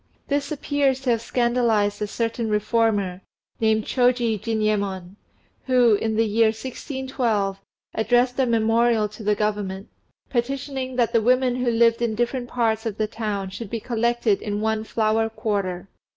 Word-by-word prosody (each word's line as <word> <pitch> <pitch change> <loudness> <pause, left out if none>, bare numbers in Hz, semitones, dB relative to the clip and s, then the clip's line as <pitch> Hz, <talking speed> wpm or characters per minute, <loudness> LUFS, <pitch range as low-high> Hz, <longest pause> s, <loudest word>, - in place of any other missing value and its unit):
This 285 +1 -1
appears 285 -2 0
to 260 -2 +1
have 230 -1 +1
scandalized 230 -4 +1
a 210 - 0
certain 230 +1 -2
reformer, 210 -3 +1 0.4
named 220 -1 +2
Shôji 245 -4 +2
Jinyémon, 200 -5 -1 0.5
who, 250 -3 +5
in 220 +1 0
the 225 +1 +3
year 220 +1 +3
1612, 235 -4 -2 0.3
addressed 245 +4 +2
a 260 - +3
memorial 230 -1 +2
to 210 +2 -12
the 210 0 +1
Government, 205 -2 -2 0.4
petitioning 265 +1 -3
that 240 -2 +1
the 230 - +4
women 250 +2 +2
who 250 -1 0
lived 230 0 +3
in 230 -2 0
different 240 +2 -2
parts 225 -2 0
of 215 -2 -4
the 215 - +1
town 210 -3 -4
should 205 +1 -7
be 230 - -3
collected 235 -2 0
in 205 -1 -3
one 220 0 0
"Flower 220 0 +1
Quarter." 195 -5 -3
225 Hz, 150 wpm, -23 LUFS, 210-245 Hz, 0.5 s, who